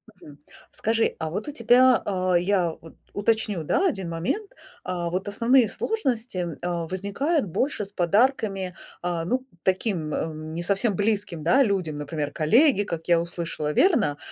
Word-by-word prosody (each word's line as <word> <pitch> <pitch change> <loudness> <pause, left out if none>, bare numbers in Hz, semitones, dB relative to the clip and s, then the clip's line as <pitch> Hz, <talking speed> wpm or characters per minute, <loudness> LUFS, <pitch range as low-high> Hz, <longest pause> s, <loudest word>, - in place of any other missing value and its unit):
Мгм. 145 -1 -15 0.3
Скажи, 225 +1 0
а 160 - -2
вот 205 - -4
у - - -3
тебя, 250 -1 +4
а, 185 -2 0
я 180 -1 +2
вот 165 - -14 0.2
уточню, 205 -4 0
да, 375 - +2
1 190 - -3
момент. 185 - -2 0.3
А, 175 -2 -3
вот 185 +3 -3
основные 230 +4 +3
сложности, 250 - -2
м 170 -4 -3
а, 170 -2 -2
возникают 200 - -1
больше 210 - -1
с 200 - -11
подарками, 195 -1 +1 0.3
а, 175 -2 -2
ну, 255 +7 -1 0.2
таким, 185 -5 0
ам, 155 0 -4
не 170 - -3
совсем 200 +3 +1
близким, 205 -5 -1
да, 260 +11 +5
людям, 185 - -1
например, 145 0 -4
коллеги, 225 - +4
как 170 -5 -5
я 170 -1 +4
услышала, 170 -3 -3
верно? 215 - +3
190 Hz, 160 wpm, -25 LUFS, 170-230 Hz, 0.3 s, да